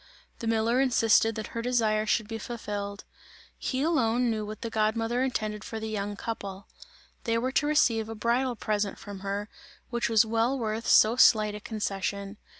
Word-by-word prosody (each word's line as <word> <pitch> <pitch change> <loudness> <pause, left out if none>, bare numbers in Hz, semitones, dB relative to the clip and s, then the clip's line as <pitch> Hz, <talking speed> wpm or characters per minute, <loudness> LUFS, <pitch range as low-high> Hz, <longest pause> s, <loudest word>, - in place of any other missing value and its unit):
The 230 - -4
miller 225 +3 +2
insisted 225 -3 +3
that 220 - -5
her 230 - -2
desire 220 -3 +1
should 215 0 +1
be 225 0 -5
fulfilled; 205 -3 -5 0.5
he 260 +1 -2
alone 245 -6 +2
knew 215 -1 -2
what 215 0 -8
the 230 - -3
god 215 0 +1
mother 230 +2 -1
intended 215 -5 -2
for 225 - -6
the 220 - -4
young 205 -1 -3
couple; 200 -3 -6 0.6
they 230 -1 +1
were 255 +3 -1
to 290 +2 +1
receive 230 -7 +2
a 225 - -5
bridal 240 +3 0
present 210 -2 -2
from 205 -2 -9
her, 200 +1 -3 0.4
which 240 -1 0
was 225 -1 +5
well 230 +4 +1
worth 225 -1 -3
so 220 +3 +5
slight 215 -4 +5
a 210 - -6
concession. 200 -1 -4
225 Hz, 180 wpm, -28 LUFS, 210-235 Hz, 0.6 s, was